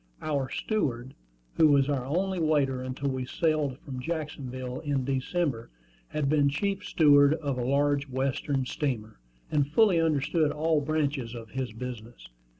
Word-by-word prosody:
Our 140 -4 -1
steward, 135 - -2 0.4
who 160 - +6
was 140 -2 +4
our 135 -3 -1
only 185 +5 0
waiter 145 -5 +1
until 130 +2 -3
we 130 -1 -3
sailed 150 -2 0
from 130 -3 -6
Jacksonville 130 -4 -4
in 140 -4 -1
December, 135 -1 -1 0.4
had 150 -2 -2
been 145 -1 +3
chief 195 +7 -2
steward 145 -5 +5
of 140 -5 -3
a - - -1
large 140 +2 +1
Western 135 +1 -1
steamer, 125 - -3 0.3
and 145 -2 +2
fully 195 -3 +4
understood 155 0 +1
all 155 0 +1
branches 140 -5 -1
of 115 -2 -9
his 130 -3 -3
business. 120 - -8
140 Hz, 150 wpm, -28 LUFS, 130-155 Hz, 0.4 s, who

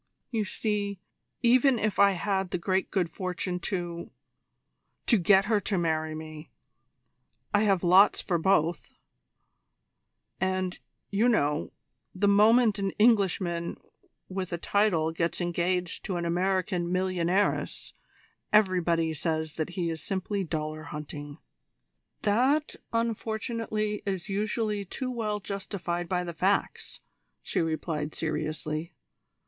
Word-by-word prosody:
You 220 -3 0
see, 200 -1 -2 0.4
even 250 +2 +5
if 215 -2 -1
I 200 0 +6
had 190 0 -1
the - - -1
great 190 +2 0
good 185 -4 +1
fortune 180 0 -3
to 175 -2 -4 1.0
to 235 - +5
get 190 +2 +5
her 215 -1 +2
to 195 0 -1
marry 160 -2 0
me, 155 0 -8 1.0
I 205 - +4
have 195 -3 +2
lots 185 +4 +6
for 175 -3 0
both; 170 -1 +1 1.5
and, 185 -1 -1 0.3
you 215 +5 +3
know, 150 -10 +1 0.4
the 205 +2 +2
moment 215 +1 +5
an 195 -1 0
Englishman 190 -6 +2 0.5
with 190 -1 -4
a 170 - -1
title 170 -4 +2
gets 165 0 -1
engaged 175 0 -1
to 190 - -2
an 170 0 -2
American 180 +1 0
millionairess 185 +1 0 0.6
everybody 175 -6 +3
says 160 0 -2
that 155 +1 -3
he 170 -2 0
is 160 -2 -5
simply 195 +1 -2
dollar 155 -2 -3
hunting." 145 -1 -7 0.9
"That, 260 +9 +2 0.2
unfortunately, 220 -2 -2
is 190 0 -2
usually 210 +1 -1
too 255 +7 -4
well 215 -4 -2
justified 190 -3 -4
by 180 -1 0
the 170 -1 -5
facts," 190 +5 -1 0.4
she - - -1
replied 155 -2 -2
seriously. 155 +1 -3
185 Hz, 120 wpm, -28 LUFS, 170-205 Hz, 1.5 s, I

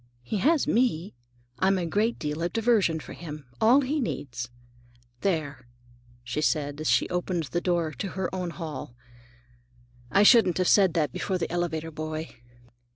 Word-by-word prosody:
"He 120 - -2
has 300 - +3
me. 210 -7 +1 0.5
I'm 190 +1 +3
a 180 - -1
great 210 +8 0
deal 150 +1 -3
of 170 +1 -2
diversion 220 -8 +2
for - - -9
him; 150 -4 -8 0.2
all 245 +6 +6
he 285 +3 -1
needs. 125 - -4 0.7
There," 145 -9 -2 0.6
she 125 +5 -3
said 145 -1 0
as 155 - 0
she 120 - +3
opened 180 -1 -1
the 175 - 0
door 175 -3 +1
into 150 +7 -5
her 190 -1 0
own 180 -2 -2
hall, 155 -8 -7 1.2
"I 200 - +5
shouldn't 210 -5 +6
have 185 -1 +1
said 190 -5 +5
that 150 -5 +1
before 190 +8 -2
the 175 - -3
elevator 165 -2 -2
boy." 155 +1 -5
170 Hz, 160 wpm, -27 LUFS, 155-195 Hz, 1.2 s, all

